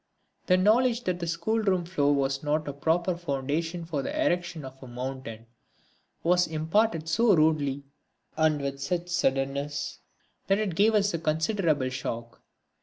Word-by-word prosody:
The 185 Hz, -, +5 dB
knowledge 235 Hz, +5 st, +3 dB
that 180 Hz, -1 st, -1 dB
the 170 Hz, -, -3 dB
schoolroom 195 Hz, +1 st, 0 dB
floor 145 Hz, -5 st, +1 dB
was 135 Hz, -1 st, 0 dB
not 150 Hz, +1 st, -1 dB
a 145 Hz, -, -3 dB
proper 170 Hz, +5 st, 0 dB
foundation 165 Hz, +2 st, -2 dB
for 155 Hz, -4 st, -2 dB
the -, -, -4 dB
erection 175 Hz, -, -1 dB
of 130 Hz, 0 st, -11 dB
a 130 Hz, -, -9 dB
mountain 125 Hz, -2 st, -6 dB, 0.8 s
was 180 Hz, +1 st, +3 dB
imparted 160 Hz, +2 st, 0 dB
so 215 Hz, +5 st, +4 dB
rudely, 150 Hz, -3 st, +2 dB, 0.5 s
and 155 Hz, -2 st, +2 dB
with 140 Hz, 0 st, -4 dB
such 175 Hz, +5 st, -2 dB
suddenness, 140 Hz, -2 st, -1 dB, 0.5 s
that 195 Hz, -, +3 dB
it 210 Hz, -4 st, -1 dB
gave 215 Hz, +6 st, +3 dB
us 205 Hz, -2 st, +2 dB
a 170 Hz, -, -1 dB
considerable 160 Hz, -3 st, +1 dB
shock. 115 Hz, -3 st, -5 dB
160 Hz, 150 wpm, -27 LUFS, 140-180 Hz, 0.8 s, The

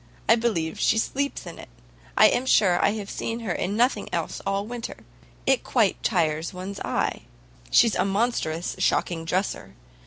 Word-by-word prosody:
I -, -, +7 dB
believe 210 Hz, -9 st, -1 dB
she 225 Hz, -, +3 dB
sleeps 280 Hz, +3 st, -1 dB
in 170 Hz, -, -9 dB
it. -, -, -11 dB, 0.5 s
I -, -, +8 dB
am 255 Hz, +2 st, +3 dB
sure 185 Hz, -8 st, +4 dB
I -, -, +3 dB
have 210 Hz, -2 st, -5 dB
seen 230 Hz, +3 st, -4 dB
her 215 Hz, -5 st, -3 dB
in 195 Hz, +4 st, -2 dB
nothing 245 Hz, +3 st, +1 dB
else -, -, -3 dB
all 195 Hz, +1 st, 0 dB
winter. 235 Hz, +1 st, -7 dB, 0.4 s
It 265 Hz, -1 st, +2 dB
quite 225 Hz, -6 st, +1 dB
tires 165 Hz, -3 st, 0 dB
one's 195 Hz, +2 st, -6 dB
eye. -, -, -2 dB, 0.4 s
She's 230 Hz, -3 st, +5 dB
a -, -, +1 dB
monstrous 195 Hz, -5 st, -1 dB
shocking 170 Hz, -2 st, 0 dB
dresser. 180 Hz, -, -2 dB
200 Hz, 165 wpm, -25 LUFS, 175-230 Hz, 0.5 s, I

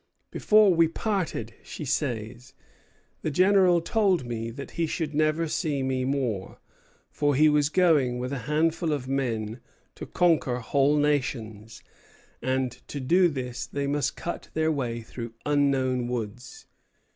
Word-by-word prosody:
"Before 210 Hz, -3 st, +4 dB
we 165 Hz, -1 st, +4 dB
parted," 165 Hz, -, -3 dB
she 155 Hz, -, -8 dB
says, 125 Hz, -2 st, -3 dB, 0.7 s
"the -, -, -1 dB
General 185 Hz, +1 st, +4 dB
told 190 Hz, -, +1 dB
me 115 Hz, -1 st, -4 dB
that 140 Hz, +5 st, -8 dB
he 170 Hz, -1 st, -1 dB
should 155 Hz, -1 st, -3 dB
never 155 Hz, +2 st, +1 dB
see 150 Hz, -4 st, -1 dB
me 130 Hz, -1 st, -1 dB
more; 130 Hz, -8 st, -2 dB, 0.5 s
for 145 Hz, -2 st, +1 dB
he 155 Hz, +3 st, +5 dB
was 150 Hz, -1 st, +3 dB
going 155 Hz, -8 st, +3 dB
with 125 Hz, +2 st, -4 dB
a 135 Hz, -, -3 dB
handful 160 Hz, +1 st, +1 dB
of 135 Hz, -3 st, -4 dB
men 120 Hz, -4 st, -2 dB, 0.3 s
to -, -, -8 dB
conquer 160 Hz, -8 st, +2 dB
whole 140 Hz, +4 st, +2 dB
nations; 115 Hz, -7 st, -2 dB, 0.6 s
and 130 Hz, 0 st, 0 dB, 0.2 s
to 145 Hz, -, -5 dB
do 175 Hz, +8 st, +4 dB
this 130 Hz, -5 st, -4 dB
they 140 Hz, 0 st, -3 dB
must 145 Hz, -1 st, -1 dB
cut 170 Hz, -, -6 dB
their 160 Hz, 0 st, +2 dB
way 120 Hz, -6 st, -2 dB
through 115 Hz, 0 st, -8 dB
unknown 135 Hz, -4 st, +1 dB
woods. 120 Hz, 0 st, -6 dB
140 Hz, 145 wpm, -26 LUFS, 125-160 Hz, 0.7 s, he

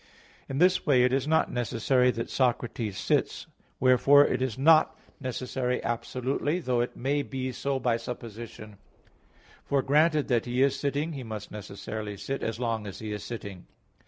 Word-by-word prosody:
In 135 Hz, -, -3 dB
this 180 Hz, +3 st, +4 dB
way 130 Hz, -5 st, +4 dB
it 125 Hz, +1 st, +2 dB
is 135 Hz, +1 st, 0 dB
not 160 Hz, +1 st, +2 dB
necessary 125 Hz, +2 st, +1 dB
that 115 Hz, -2 st, -2 dB
Socrates 120 Hz, -5 st, -1 dB
sits: -, -, 0 dB, 0.3 s
wherefore 135 Hz, +3 st, +6 dB
it -, -, -1 dB
is 130 Hz, -2 st, -1 dB
not 155 Hz, +3 st, +5 dB, 0.2 s
necessary 125 Hz, -1 st, -2 dB
absolutely, 125 Hz, +6 st, -1 dB
though 125 Hz, -7 st, 0 dB
it 120 Hz, -, -4 dB
may 140 Hz, +3 st, 0 dB
be 130 Hz, -2 st, -4 dB
so 135 Hz, +2 st, -2 dB
by 120 Hz, -2 st, +1 dB
supposition; 115 Hz, -3 st, -8 dB, 0.9 s
for, 140 Hz, -2 st, 0 dB
granted 150 Hz, +1 st, +3 dB
that 120 Hz, -3 st, +1 dB
he 125 Hz, +2 st, +2 dB
is 135 Hz, -1 st, +2 dB
sitting, 145 Hz, +3 st, -2 dB
he 140 Hz, -, -6 dB
must 110 Hz, -3 st, -7 dB
necessarily 105 Hz, 0 st, -6 dB
sit, 130 Hz, +7 st, -4 dB
as 110 Hz, 0 st, -3 dB
long 115 Hz, -3 st, -2 dB
as 95 Hz, -, -7 dB
he 110 Hz, -1 st, -6 dB
is 105 Hz, -1 st, -5 dB
sitting. 100 Hz, -5 st, -7 dB
125 Hz, 165 wpm, -28 LUFS, 115-140 Hz, 0.9 s, wherefore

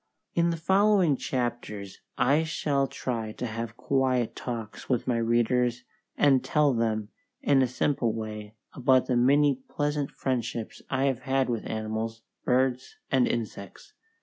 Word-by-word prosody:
In 170 Hz, 0 st, +2 dB
the 165 Hz, -, -1 dB
following 190 Hz, -2 st, +3 dB
chapters 120 Hz, -6 st, -4 dB, 0.2 s
I 140 Hz, +6 st, +3 dB
shall 145 Hz, -3 st, 0 dB
try 115 Hz, -5 st, -4 dB
to 125 Hz, -, -5 dB
have 115 Hz, 0 st, -5 dB
quiet 130 Hz, -4 st, +1 dB
talks 115 Hz, -3 st, -6 dB
with 125 Hz, -2 st, 0 dB
my 120 Hz, -2 st, +2 dB
readers 120 Hz, +1 st, +1 dB, 0.3 s
and 135 Hz, -3 st, +4 dB
tell 150 Hz, -3 st, +3 dB
them 110 Hz, -3 st, -1 dB, 0.3 s
in 140 Hz, -2 st, +4 dB
a 130 Hz, -, +3 dB
simple 125 Hz, -1 st, 0 dB
way 110 Hz, -1 st, -6 dB, 0.2 s
about 130 Hz, 0 st, +3 dB
the 125 Hz, -, 0 dB
many 140 Hz, +2 st, +4 dB
pleasant 145 Hz, -1 st, -1 dB
friendships 120 Hz, -3 st, -3 dB
I 130 Hz, 0 st, 0 dB
have 135 Hz, -4 st, +1 dB
had 135 Hz, -2 st, 0 dB
with 115 Hz, -, -3 dB
animals, 110 Hz, +1 st, -3 dB, 0.2 s
birds, 130 Hz, 0 st, +1 dB, 0.2 s
and 130 Hz, -2 st, +4 dB
insects. 110 Hz, -4 st, -5 dB
125 Hz, 145 wpm, -27 LUFS, 115-135 Hz, 0.3 s, and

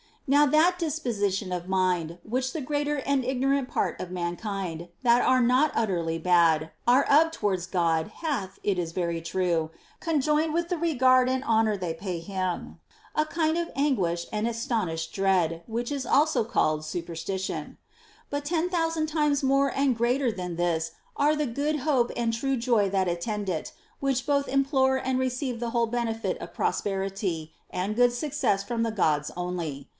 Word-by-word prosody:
Now 290 Hz, +1 st, +5 dB
that 330 Hz, +5 st, +4 dB
disposition 215 Hz, -, -1 dB
of 180 Hz, 0 st, -3 dB
mind 180 Hz, -3 st, 0 dB
which 255 Hz, +3 st, -2 dB
the 320 Hz, -, -3 dB
greater 290 Hz, +2 st, -1 dB
and 275 Hz, 0 st, 0 dB
ignorant 265 Hz, +1 st, +1 dB
part -, -, -1 dB
of 180 Hz, -, -5 dB
mankind, 175 Hz, -1 st, -4 dB, 0.2 s
that 240 Hz, 0 st, +5 dB
are 255 Hz, 0 st, +4 dB
not 255 Hz, +5 st, +3 dB
utterly 170 Hz, -7 st, 0 dB
bad, 165 Hz, -2 st, +3 dB, 0.2 s
are 255 Hz, +3 st, +6 dB
of 320 Hz, +3 st, +4 dB
towards 190 Hz, -, -1 dB
God, 165 Hz, -3 st, +1 dB
hath, 240 Hz, -, -2 dB
it 195 Hz, -3 st, +1 dB
is 165 Hz, -1 st, -3 dB
very 170 Hz, -2 st, -1 dB
true, 170 Hz, -2 st, 0 dB, 0.3 s
conjoined 305 Hz, -1 st, +1 dB
with 340 Hz, +1 st, 0 dB
the 355 Hz, -, 0 dB
regard 255 Hz, -6 st, +4 dB
and 260 Hz, +1 st, 0 dB
honor 220 Hz, -3 st, +2 dB
they 180 Hz, -3 st, -3 dB
pay 180 Hz, 0 st, -4 dB
him, 185 Hz, 0 st, -4 dB, 0.3 s
a 305 Hz, -, +2 dB
kind 320 Hz, 0 st, 0 dB
of 340 Hz, 0 st, -1 dB
anguish 185 Hz, -, +1 dB
and 215 Hz, +1 st, -1 dB
astonished 215 Hz, -9 st, -2 dB
dread, 180 Hz, -4 st, +1 dB
which 235 Hz, +2 st, -3 dB
is 275 Hz, -2 st, -2 dB
also 300 Hz, -5 st, +3 dB
called 155 Hz, -8 st, +1 dB
superstition; 170 Hz, +4 st, -4 dB, 0.5 s
but 285 Hz, 0 st, -3 dB
ten 335 Hz, +3 st, 0 dB
thousand 325 Hz, -3 st, 0 dB
times 300 Hz, -2 st, +1 dB
more 275 Hz, +1 st, +3 dB
and 270 Hz, -3 st, +2 dB
greater 245 Hz, +2 st, +2 dB
than 180 Hz, -4 st, -5 dB
this 165 Hz, -1 st, -1 dB, 0.2 s
are 295 Hz, +2 st, +3 dB
the 300 Hz, 0 st, 0 dB
good 285 Hz, +5 st, -1 dB
hope 260 Hz, -4 st, +2 dB
and 230 Hz, -1 st, 0 dB
true 270 Hz, +4 st, 0 dB
joy 230 Hz, -5 st, +2 dB
that 190 Hz, -2 st, +1 dB
attend 200 Hz, +4 st, -3 dB
it, 165 Hz, -4 st, -3 dB, 0.3 s
which 270 Hz, -2 st, 0 dB
both 280 Hz, -1 st, +1 dB
implore 270 Hz, -1 st, +2 dB
and 260 Hz, 0 st, 0 dB
receive 255 Hz, -1 st, -2 dB
the 235 Hz, -1 st, -3 dB
whole 235 Hz, -1 st, +1 dB
benefit 225 Hz, -1 st, -2 dB
of -, -, -9 dB
prosperity 195 Hz, -5 st, -2 dB, 0.2 s
and 195 Hz, +4 st, -3 dB
good 245 Hz, 0 st, +5 dB
success 245 Hz, -7 st, 0 dB
from 235 Hz, +2 st, -2 dB
the 230 Hz, -, 0 dB
Gods 150 Hz, -8 st, +1 dB
only. 170 Hz, -6 st, -4 dB
230 Hz, 170 wpm, -27 LUFS, 180-275 Hz, 0.5 s, are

